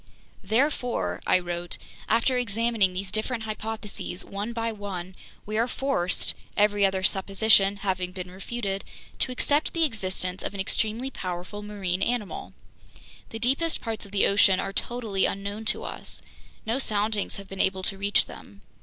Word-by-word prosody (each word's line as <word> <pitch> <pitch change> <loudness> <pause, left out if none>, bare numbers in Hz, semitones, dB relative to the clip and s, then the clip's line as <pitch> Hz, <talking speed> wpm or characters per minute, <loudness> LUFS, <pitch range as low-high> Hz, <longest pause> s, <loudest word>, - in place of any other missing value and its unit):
"Therefore," 245 +4 +1
I - - +6
wrote, 175 -1 -3 0.3
"after 230 +3 +3
examining 230 -4 +2
these 185 +1 -3
different 220 +2 -1
hypotheses 215 -3 -5
one 205 +3 -3
by 230 -1 -1
one, 190 -4 -5 0.3
we 215 +1 -1
are 235 - +3
forced, 250 -9 +1 0.2
every 205 0 +4
other 190 -1 -1
supposition 195 +1 +4
having 185 -2 0
been 180 -1 -6
refuted, 195 +1 -3 0.4
to 255 - +1
accept 290 +4 +1
the 330 - +2
existence 185 - -1
of - - -4
an - - -5
extremely 220 +6 0
powerful 185 0 -5
marine 195 -3 -2
animal. 235 -4 -1 0.8
"The 225 - -5
deepest 270 +8 +2
parts 225 -2 -3
of - - -16
the 200 - +4
ocean 200 -1 +5
are 195 - -2
totally 220 -5 +1
unknown 200 +2 -4
to - - +1
us. - - -7 0.4
No 230 +4 +1
soundings 210 -3 +1
have 200 -1 -8
been 195 0 -2
able 190 0 +1
to 195 - 0
reach 200 +1 +3
them. 100 0 -12
205 Hz, 155 wpm, -27 LUFS, 190-230 Hz, 0.8 s, I